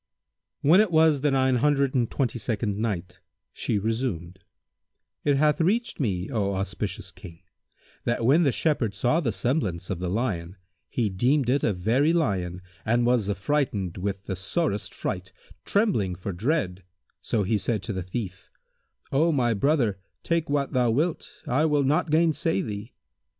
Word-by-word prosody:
When 170 +8 +6
it 215 - +2
was 160 -4 +4
the 145 - +3
Nine 130 -2 +2
Hundred 140 +1 +2
and 120 -3 +1
Twenty 125 -3 -1
second 105 -2 -2
Night, 95 -6 -3 0.3
She 105 - -1
resumed: 100 -5 -2 0.8
It 145 -2 +3
hath 150 +2 +3
reached 220 +8 0
me, 95 -8 -1
O 100 -3 0
auspicious 95 +2 -4
King, 85 -1 -13 0.6
that 120 -1 0
when 145 +7 +5
the 145 -5 +3
Shepherd 125 -9 0
saw 120 +10 +2
the 135 -9 0
semblance 100 - -1
of 90 - -3
the 90 -1 -2
lion, 95 -5 -2 0.3
he 120 -3 0
deemed 125 +6 +2
it 140 +1 +1
a - - +3
very 115 - +2
lion 90 - -1 0.2
and 120 +2 +2
was 120 -4 +2
affrighted 100 - -1
with 100 0 -3
the 95 - -4
sorest 105 - -1
fright, 90 0 -4 0.3
trembling 185 - +1
for 95 +2 -5
dread 100 - -1 0.4
so 105 - 0
he 105 +2 +1
said 105 +1 -1
to 115 - -3
the 95 - -3
thief, 95 +1 -6 0.6
"O 160 +5 +3
my 125 -6 +2
brother 115 -4 +1 0.2
take 170 -2 0
what 140 -1 0
thou 125 -2 +3
wilt, 155 +8 0 0.2
I 135 +6 +2
will 150 -2 +2
not 150 +4 +1
gainsay 155 - +2
thee." 105 +1 -6
120 Hz, 160 wpm, -26 LUFS, 95-145 Hz, 0.8 s, When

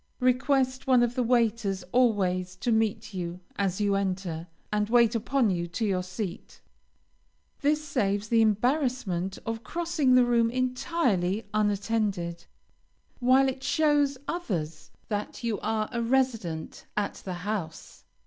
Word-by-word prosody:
Request 260 +1 +1
one 255 -2 +5
of 240 0 0
the 250 - 0
waiters 230 -5 +1
always 185 -7 +2
to 235 +6 -1
meet 220 -1 0
you 175 -1 -4 0.2
as 195 -1 -1
you 205 -1 +2
enter, 185 -4 -2 0.3
and 210 0 +1
wait 235 -1 +5
upon 235 0 +1
you 175 -1 -2
to 195 +7 -2
your 190 -3 +1
seat. 185 0 -6 1.0
This 300 +1 +1
saves 205 -7 0
the 230 0 +4
embarrassment 220 - +1
of 225 0 -4
crossing 330 -6 +1
the 250 -1 +6
room 235 -1 +3
entirely 250 - 0
unattended, 205 -4 0 0.7
while 260 +2 +5
it 265 0 -3
shows 290 -2 +2
others 170 - -3 0.2
that 210 +2 -4
you 225 -4 -1
are 215 -1 -1
a 235 -1 -2
resident 230 -10 -1
at 205 -1 -2
the 185 - -4
house. 195 -7 -5
225 Hz, 135 wpm, -27 LUFS, 195-255 Hz, 1.0 s, the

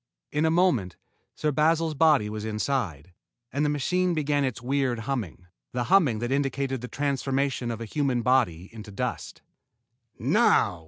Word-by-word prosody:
In 150 +2 +1
a - - +3
moment, 160 - +2 0.4
Sir 150 - 0
Basil's 160 +2 +2
body 150 -7 +4
was 105 0 -5
inside, 105 - -2 0.4
and 140 +2 0
the 150 - +2
machine 180 +5 0
began 145 -2 +1
its 130 -4 -2
weird 130 -1 -1
humming, 110 - -4 0.3
the 125 0 -1
humming 150 - +4
that 120 +3 -3
indicated 135 -2 -1
the 125 - -5
transformation 135 -2 -1
of 115 -1 -4
a - - -4
human 130 0 -1
body 110 -10 +2
into 110 -2 -9
dust. 100 - -5 0.7
"Now!" 85 - +3
135 Hz, 155 wpm, -26 LUFS, 115-145 Hz, 0.7 s, body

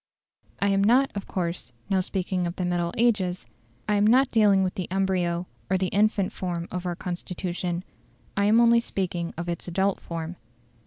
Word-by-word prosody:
I 200 - +2
am 195 0 +3
not, 255 +6 +4
of 200 - -5
course, 170 -9 -3
now 195 -1 +2
speaking 185 -1 -1
of 170 - -5
the 185 - -2
middle 175 -1 0
ages: 205 -6 +1 0.4
I 210 - +2
am 205 +1 +4
not 255 +4 +4
dealing 205 -4 +5
with 185 - -1
the 185 - -4
embryo 180 -2 0 0.2
or 190 - +3
the 185 -1 0
infant 205 -1 +2
form 175 -2 -3
of 180 0 -3
our 175 - -2
Constitution; 180 0 -4 0.5
I 200 - +2
am 215 +3 +5
only 235 0 +6
speaking 180 -6 -3
of 170 +1 -4
its 170 0 -4
adult 190 +3 +1
form. 165 +1 -6
185 Hz, 180 wpm, -26 LUFS, 175-200 Hz, 0.5 s, only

